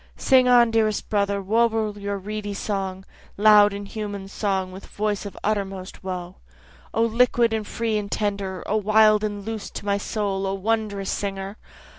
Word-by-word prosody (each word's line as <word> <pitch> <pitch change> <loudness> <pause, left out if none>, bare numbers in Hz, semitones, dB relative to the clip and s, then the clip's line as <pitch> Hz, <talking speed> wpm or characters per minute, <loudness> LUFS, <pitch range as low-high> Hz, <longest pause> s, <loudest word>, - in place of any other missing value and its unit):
Sing 260 -2 +4
on 240 -2 +6
dearest 220 -2 +1
brother, 200 -1 0
warble 220 0 +1
your 200 0 -3
reedy 205 +1 -5
song, 195 -2 -3 0.3
Loud 210 0 +7
human 200 0 -6
song, 195 -2 -2
with 190 +1 -10
voice 205 -1 -2
of 200 - -10
uttermost 195 -3 -3
woe. 180 -1 -5 0.5
O 225 - +1
liquid 235 0 +3
and 215 -2 -2
free 225 -2 -1
and 200 -1 -6
tender! 200 -3 -2
O 215 - 0
wild 215 0 +4
and 205 -2 -3
loose 220 -1 -5
to - - -8
my 200 0 +1
soul 200 -2 -2
O 195 - -1
wondrous 205 -1 -1
singer! 195 0 -4
205 Hz, 160 wpm, -24 LUFS, 195-215 Hz, 0.5 s, Loud